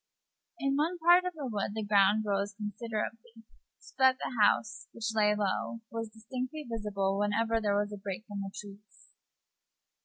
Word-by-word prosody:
In 275 -2 0
one 330 +5 +1
part 350 +2 +6
of 365 - -2
the 295 -3 -5
wood 210 -3 -2
the 220 - -2
ground 205 +1 +4
rose 200 0 -1
considerably, 225 +1 -5 0.3
so - - -17
that 260 -1 +6
the - - -4
house, 210 -1 +2
which 225 -1 -3
lay 210 -1 +3
low, 210 +3 -1
was 225 -1 -4
distinctly 255 +7 -6
visible 200 -4 -1
whenever 225 +2 +1
there 205 -1 +2
was 205 0 -1
a - - -5
break 195 +1 -5
in 205 -2 -5
the 195 -1 -4
trees. 205 +1 -13
215 Hz, 165 wpm, -31 LUFS, 205-235 Hz, 0.3 s, part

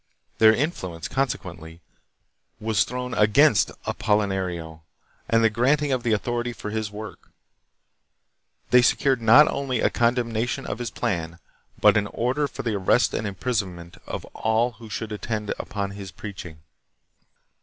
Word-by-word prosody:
Their 110 0 +8
influence, 95 - -3
consequently, 85 - -4 0.8
was 110 -2 +1
thrown 125 0 -5
against 105 +5 +4 0.2
Apolinario, 95 -6 -1 0.5
and 115 0 +3
the 115 - +5
granting 140 +6 +2
of 130 -2 +1
the 120 -1 -1
authority 120 +3 -1
for 105 -2 -7
his 110 -1 -2
work. 105 -2 -9 1.4
They 125 - +7
secured 130 0 +2
not 120 +7 +7
only 135 -3 -1
a - - +2
condemnation 120 -1 0
of 105 - -4
his 120 -2 -3
plan, 85 -3 -3 0.4
but - - +5
an 100 -1 +1
order 130 +7 -1
for - - -7
the 115 -2 -1
arrest 100 +5 +2
and 110 - -2
imprisonment 95 -5 -3
of - - -5
all 110 +2 +1
who 115 -1 -13
should 110 +1 -5
attend 105 0 -3
upon 100 -1 -4
his 100 -1 -8
preaching. 95 -8 -9
110 Hz, 140 wpm, -24 LUFS, 100-120 Hz, 1.4 s, Their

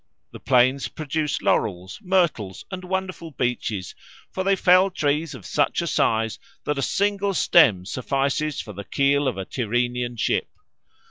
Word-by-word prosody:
The - - -10
plains 130 +1 +3
produce 155 -1 -3
laurels, 95 -1 0
myrtles, 170 - 0
and 185 -1 -6
wonderful 185 -2 -4
beeches; 120 - -3 0.4
for 190 - -3
they 195 +1 +3
fell 185 +1 +5
trees 155 -2 -1
of - - -12
such 145 - 0
a 170 - -1
size 115 -7 0 0.2
that 150 -1 -1
a - - 0
single 200 +4 0
stem 105 - +4
suffices 135 +6 -1
for 105 - -9
the 100 +1 -7
keel 140 +4 +1
of 125 - -1
a 95 - -4
Tyrrhenian 120 +1 -2
ship. - - 0
140 Hz, 150 wpm, -23 LUFS, 120-175 Hz, 0.4 s, fell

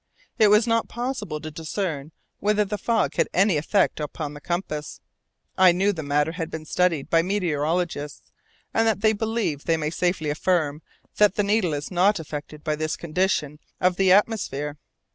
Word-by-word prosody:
It 215 - +7
was 210 +2 +5
not 230 -1 +1
possible 235 - -4
to 155 - -6
discern 160 -2 -4 0.3
whether 210 0 +2
the 210 +1 -4
fog 230 -1 +1
had - - +3
any 195 -1 +4
effect 160 +6 +1
upon 150 0 -4
the 145 - -10
compass. 155 -4 -4 0.6
I 185 -1 +8
knew 195 +4 +1
the 160 - -5
matter 145 +1 +1
had 165 -1 -4
been 160 -1 -6
studied 165 -3 +1
by 165 - +3
meteorologists, 165 -4 -2 0.4
and 225 0 +2
that 215 -3 +1
they 220 0 +4
believe 220 -9 -2
they 165 -1 +2
may 155 -1 -2
safely 175 -3 0
affirm 155 -2 0 0.4
that 210 -2 +4
the 205 - +1
needle 200 -6 +1
is 145 +5 -5
not 190 +2 +3
affected 150 -1 -7
by 155 -1 0
this 155 0 -2
condition 155 -3 -1 0.2
of 180 0 +2
the 190 -1 +4
atmosphere. 185 -8 +1
175 Hz, 175 wpm, -24 LUFS, 150-205 Hz, 0.6 s, I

